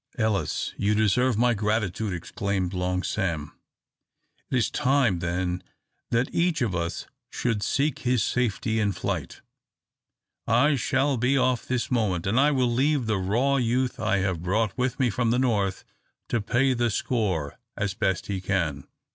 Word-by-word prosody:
"Ellis, 110 -4 0
you 105 +1 +1
deserve 110 +3 +2
my 120 +1 +3
gratitude!" 105 -1 -1
exclaimed 95 +1 -2
Long 90 0 -1
Sam. 85 -8 -2 1.0
"It 130 - +1
is 120 - +1
time 125 -9 +2
then 90 +1 -2 0.5
that 120 +2 0
each 170 -5 +1
of 110 -6 -1
us 85 -1 -3 0.2
should 115 -4 -1
seek 140 +6 0
his 125 -3 +1
safety 115 -2 0
in 105 -2 +1
flight. - - -4 1.1
I 135 +6 +4
shall 135 +1 +1
be 125 +4 +2
off 130 -2 +1
this 125 +1 -1
moment; 100 -8 0
and 105 +6 +2
I 145 +2 +5
will 130 -4 +1
leave 140 +1 +2
the 110 -3 0
raw 120 +9 +1
youth 125 +1 0
I 110 -2 +1
have 95 -4 -1
brought 105 +4 0
with 125 +1 -1
me 125 -3 +2
from 120 +2 0
the 120 - +2
north 105 -7 0 0.4
to 115 - 0
pay 130 +6 +2
the 120 -1 +1
score 95 - -1 0.2
as 100 -2 -1
best 95 -2 -1
he 95 -2 -3
can. 85 -8 -1
110 Hz, 160 wpm, -26 LUFS, 95-125 Hz, 1.1 s, I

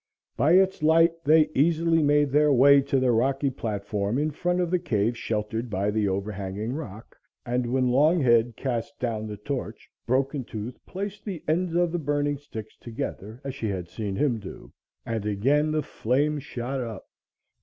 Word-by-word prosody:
By 145 +7 +3
its 190 -1 +4
light 165 +2 +4
they 155 0 +4
easily 165 +2 +3
made 145 -1 +3
their 150 +1 +4
way 140 +2 +6
to 135 0 0
the 130 -1 +2
rocky 135 +4 +1
platform 105 -2 -2
in 155 +2 0
front 175 +4 -1
of 175 -1 0
the 180 - +2
cave 120 - 0
sheltered 110 +1 -3
by 100 0 0
the 105 -1 0
overhanging 100 +3 -3
rock, 120 -7 -8 0.3
and 120 0 -1
when 130 -1 +2
Longhead 125 -5 +3
cast 125 +2 -3
down 110 -3 -3
the 105 -1 -6
torch 130 +6 -6 0.2
Broken 135 +2 0
Tooth 115 +2 -7
placed 200 +2 -5
the 185 -7 -6
ends 170 +2 0
of 175 -1 +2
the 175 - -1
burning 145 -1 -1
sticks 110 -7 -9
together 110 0 -6
as 135 -1 -4
she 130 -5 -4
had 90 -3 -4
seen 105 -2 -4
him 125 -2 +1
do, 100 - -11 0.3
and 115 -2 -3
again 130 +9 +1
the 155 -1 0
flame 145 +4 0
shot 130 -1 -4
up. 115 -5 -6
130 Hz, 175 wpm, -26 LUFS, 110-150 Hz, 0.3 s, way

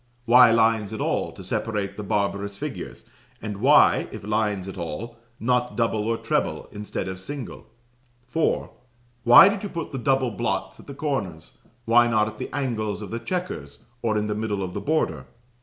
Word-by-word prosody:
Why 120 +1 +8
lines 110 -2 +2
at 110 - -5
all - - -1
to - - -11
separate 100 -3 -2
the 105 - -6
barbarous 100 -1 -2
figures; - - -6 0.3
and 105 -2 -5
why, 135 +8 +5
if 110 - -8
lines 105 -3 -1
at 95 - -7
all, 95 +7 -6 0.2
not 125 +1 0
double 110 -2 0
or 115 0 +1
treble - - -1
instead 105 -2 -5
of 95 0 -5
single? 135 +5 -7 0.6
"4. 140 +6 0 0.5
Why 120 +10 +10
did 200 0 0
you 205 - -4
put 165 -3 -5
the 135 - -4
double 135 0 +1
blots 95 -4 -3
at - - -15
the 140 - -8
corners? 110 - -4 0.3
Why 120 +1 +5
not 110 -2 +2
at 110 0 -8
the - - -4
angles 115 -7 -2
of 100 - -8
the 115 - -3
chequers, 175 - -5 0.2
or 110 -2 0
in 105 - 0
the 105 - -1
middle 105 -2 -2
of 90 -1 -5
the - - -4
border? 80 - -1
110 Hz, 185 wpm, -24 LUFS, 100-125 Hz, 0.6 s, Why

